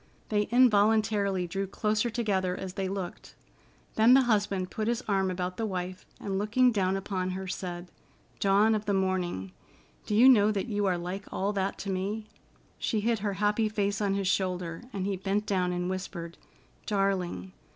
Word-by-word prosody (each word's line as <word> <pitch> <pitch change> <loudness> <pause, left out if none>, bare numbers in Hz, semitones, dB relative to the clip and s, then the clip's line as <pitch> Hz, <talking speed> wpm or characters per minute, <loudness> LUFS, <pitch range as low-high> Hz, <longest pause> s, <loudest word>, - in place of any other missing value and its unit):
They 210 -1 +1
involuntarily 215 -5 +3
drew 195 +3 -3
closer 215 +4 0
together 195 -6 -1
as 190 -1 -6
they 190 0 -2
looked. 190 -2 -6 0.6
Then 230 +3 +6
the 270 - +6
husband 205 -5 0
put 215 0 -2
his 240 +1 0
arm 195 -2 +1
about 180 0 -3
the 225 - -1
wife 185 0 -5
and, 195 -1 -2
looking 245 +5 +3
down 195 -3 +1
upon 185 -1 -3
her, 190 +1 -4
said: 175 -1 -5 0.5
"Dawn 200 +3 +4
of 215 -1 -1
the 200 - +2
Morning, 180 - -1 0.6
do 210 - 0
you 240 +5 +7
know 215 -5 +6
that 200 -2 -1
you 205 -4 -1
are 180 -2 +1
like 180 +3 -6
all 200 +2 -1
that 195 -1 -1
to 195 - -4
me?" 200 +4 -2 0.5
She 220 -3 0
hid 230 +1 +1
her 200 -1 -2
happy 210 +2 +1
face 205 -1 -1
on 200 -1 +1
his 195 -1 -1
shoulder, 180 -3 -1
and 195 -4 -3
he 195 -1 -1
bent 195 +3 -1
down 185 -3 0
and 180 0 -2
whispered: 180 -2 -5 0.5
"Darling! 185 - -1
195 Hz, 180 wpm, -29 LUFS, 185-210 Hz, 0.6 s, you